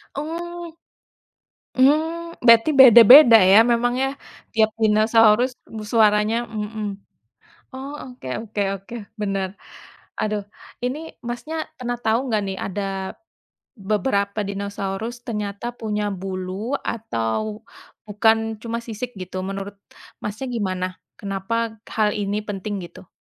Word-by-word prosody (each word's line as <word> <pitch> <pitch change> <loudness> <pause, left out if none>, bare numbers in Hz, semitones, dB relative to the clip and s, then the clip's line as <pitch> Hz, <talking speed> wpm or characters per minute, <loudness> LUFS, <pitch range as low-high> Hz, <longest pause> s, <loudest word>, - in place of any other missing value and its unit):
Oh. 340 +3 -6 1.0
Mmm, 320 +5 +1
berarti 230 +3 +7
beda-beda 240 -1 +10
ya, 195 +5 +7
memang 245 +1 +1
ya, 270 +1 0 0.4
tiap 220 -1 +2
dinosaurus 220 +2 +4
b 220 - -9
suaranya, 215 +1 +3
mhm. 210 -2 -5 0.7
Oh, 270 +2 -8 0.2
oke 165 - -6
oke 205 -1 -2 0.2
oke, 195 +5 -12 0.3
benar. 195 -2 -2 0.6
Aduh, 210 -1 -1 0.4
ini, 290 +6 -4
Masnya 280 +7 -5
pernah 245 -1 -4
tahu 235 +2 0
nggak 215 - +2
nih, 190 - -4
ada 195 -1 -4 0.6
beberapa 200 -1 -1
Dinosaurus 200 +3 -4
ternyata 210 +2 -4
punya 210 -2 -2
bulu 190 +3 -5 0.2
atau 215 - -3 0.4
bukan 220 +2 +2
cuma 230 0 -3
sisik 235 +1 -6
gitu 185 0 -5
menurut, 195 +1 -5 0.5
Masnya, 210 +6 -4
gimana? 190 -6 -2 0.3
Kenapa 220 +3 -3 0.2
hal 215 0 +1
ini 205 0 -1
penting, 205 0 -4
gitu? 180 +1 -11
220 Hz, 110 wpm, -22 LUFS, 200-240 Hz, 1.0 s, beda-beda